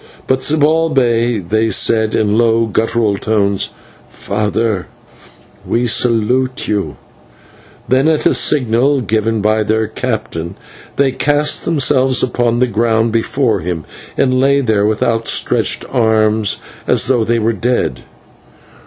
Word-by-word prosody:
But 130 0 +1
to 145 +3 +1
Zibalbay 135 -7 +1
they 110 +3 +1
said, 110 +1 +2
in 105 -1 +1
low, 115 0 +2
guttural 110 -1 0
tones, 100 -2 0 0.4
"Father, 105 -1 -2 0.8
we 120 +1 -1
salute 125 +2 0
you," 100 -9 -2 0.9
then, 130 +3 +2
at 160 -1 +1
a - - +4
signal 135 0 +1
given 110 0 -1
by 110 +1 +1
their 110 +1 0
captain, 105 -7 -4 0.4
they 135 -1 +2
cast 145 +2 0
themselves 135 -4 +2
on 120 -1 0
the 125 - +3
ground 115 -1 0
before 115 -1 0
him, 85 -2 -5 0.3
and 130 - +2
lay 140 +1 +3
there 110 -6 +1
with 110 0 -1
outstretched 115 -1 0
arms 110 -3 +1 0.3
as - - +2
though 125 -3 +2
they 115 +1 0
were 115 +1 0
dead. 120 +4 -1
115 Hz, 125 wpm, -15 LUFS, 110-130 Hz, 0.9 s, a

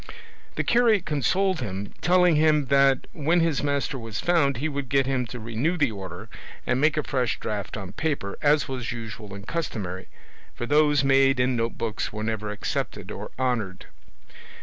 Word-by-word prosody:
The - - 0
curate 235 -6 +3
consoled 180 +6 +1
him, 100 -3 -5
telling 180 -2 +4
him 150 -1 +4
that 135 -1 +4
when 165 +3 +2
his 165 -3 +1
master 140 -1 -1
was 115 -4 -5
found 145 -7 +2
he 145 +6 -1
would 140 -3 -4
get 135 -1 +3
him 130 -2 0
to 125 +2 -7
renew 115 +10 -1
the 140 -7 +2
order, 95 -3 -8 0.4
and 125 - +1
make 155 0 +3
a 150 - +1
fresh 130 -4 -1
draft 105 0 -4
on 95 -3 -6
paper, 140 -8 -2
as 150 0 +3
was 130 -4 -4
usual 110 -3 -7
and 100 0 -9
customary; 105 - -4 0.5
for 120 - -4
those 150 +1 +4
made 135 -1 +4
in 125 0 +2
notebooks 115 -1 -2
were 105 0 -5
never 110 -1 -2
accepted 105 - -4
or - - -6
honoured. 120 -8 -1
135 Hz, 170 wpm, -25 LUFS, 110-150 Hz, 0.5 s, telling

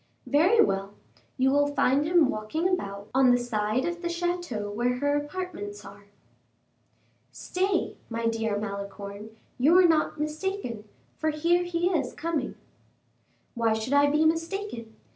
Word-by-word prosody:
"Very 345 +11 +3
well; 195 - -2 0.4
you 265 +1 +3
will 290 +1 +2
find 275 +3 +3
him 340 -3 +5
walking 215 +11 -1
about 200 - -3
on 260 -1 +5
the 245 - +5
side 230 0 -1
of 345 0 -3
the 345 - -2
chateau 340 -12 -2
where 245 +4 0
her 285 +2 +1
apartments 290 - -5
are." 200 +1 -13 1.3
"Stay, 375 0 -1
my 230 0 -3
dear 225 -2 0
Malicorne, 200 0 -6 0.3
you 290 +7 +5
were 365 0 +7
not 315 -2 +1
mistaken, 305 - -3 0.3
for 315 - +1
here 335 +3 +2
he 350 0 0
is 285 -9 -1
coming." 330 -2 -3 1.0
"Why 230 -2 +1
should 220 +5 -2
I 285 0 +5
be 300 +2 +2
mistaken? 330 - -2
285 Hz, 145 wpm, -27 LUFS, 220-340 Hz, 1.3 s, were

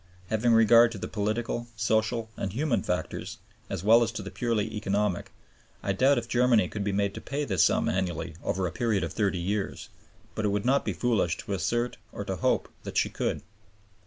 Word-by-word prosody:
Having 115 +2 +3
regard 115 +1 +6
to - - -6
the - - -5
political, 115 +3 -2
social, 110 +1 0
and 95 - -3
human 120 -2 0
factors, 90 0 -3 0.3
as 85 - -4
well 115 +3 +6
as 115 -1 +1
to 110 - -5
the 100 - -7
purely 110 -3 -1
economic, 105 -2 -1 0.5
I 100 - 0
doubt 135 +7 +4
if 120 -1 -2
Germany 120 -5 +3
could 105 - -4
be 100 - 0
made 100 0 0
to - - -7
pay 145 +1 -3
this 95 -7 +2
sum - - +2
annually 85 -4 -2
over 95 0 -1
a 85 - -2
period 110 0 0
of - - -4
30 100 -4 0
years; 100 +3 -3 0.4
but 110 - -3
it - - +2
would 100 +1 -1
not 135 +2 +3
be - - -1
foolish 115 -9 +1
to 100 - -3
assert 120 +5 -1
or 100 - -6
to 95 -2 -3
hope - - +1
that - - -5
she - - +2
could. - - -2
110 Hz, 205 wpm, -28 LUFS, 100-120 Hz, 0.5 s, regard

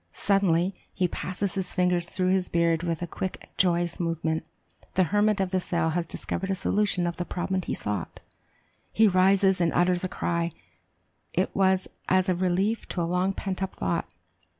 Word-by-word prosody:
Suddenly 195 -2 +2 0.2
he 185 -1 +1
passes 185 +3 -3
his 190 -2 -3
fingers 180 -1 +2
through 185 -1 0
his 185 -1 +1
beard 170 -1 +2
with 170 -1 -2
a - - 0
quick 185 +2 -6
joyous 175 -2 +1
movement 165 -2 -1 0.5
the 185 - +5
hermit 205 +3 +2
of 190 -2 0
the 190 - +2
cell 170 -2 0
has 170 0 -1
discovered 190 +3 -4
a 195 - +1
solution 200 -2 +1
of 170 -1 -2
the 175 - -1
problem 185 +2 -2
he - - -3
sought! 100 -4 -4 0.7
He 220 0 +5
rises 190 0 +4
and 165 -1 +3
utters 175 0 +2
a 185 - -1
cry; 170 -2 -1 0.8
it - - 0
was 190 -1 +3 0.2
as 185 0 +3
a - - +4
relief 190 +5 0
to 175 - -2
a - - +1
long 180 +3 +1
pent 190 -1 -4
up 190 - -3
thought. 170 -1 -2
180 Hz, 180 wpm, -27 LUFS, 170-190 Hz, 0.8 s, the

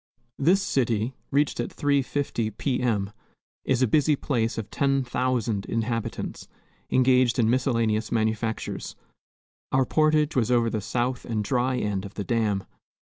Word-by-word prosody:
This 185 +7 +3
city, 120 - 0 0.2
reached 145 -1 +1
at 120 - -1
3.50 140 -6 -1
P. 130 -3 -1
M., 105 -5 0 0.5
is 130 -1 +2
a - - +4
busy 150 +5 +3
place 115 -6 -1
of 110 -3 -5
ten 135 -1 +1
thousand 120 -5 -1
inhabitants, 115 0 -3 0.4
engaged 130 -1 +3
in 115 -2 +3
miscellaneous 115 -4 +1
manufactures. 110 0 -2 0.8
Our 130 0 +3
portage 155 +1 +2
was 125 -4 +2
over 120 -2 +2
the 110 - -2
south 120 +4 -2
and 110 -3 -2
dry 125 +2 0
end 105 -5 -1
of 100 -1 -9
the 100 - -3
dam. 105 -3 0
120 Hz, 145 wpm, -26 LUFS, 110-130 Hz, 0.8 s, a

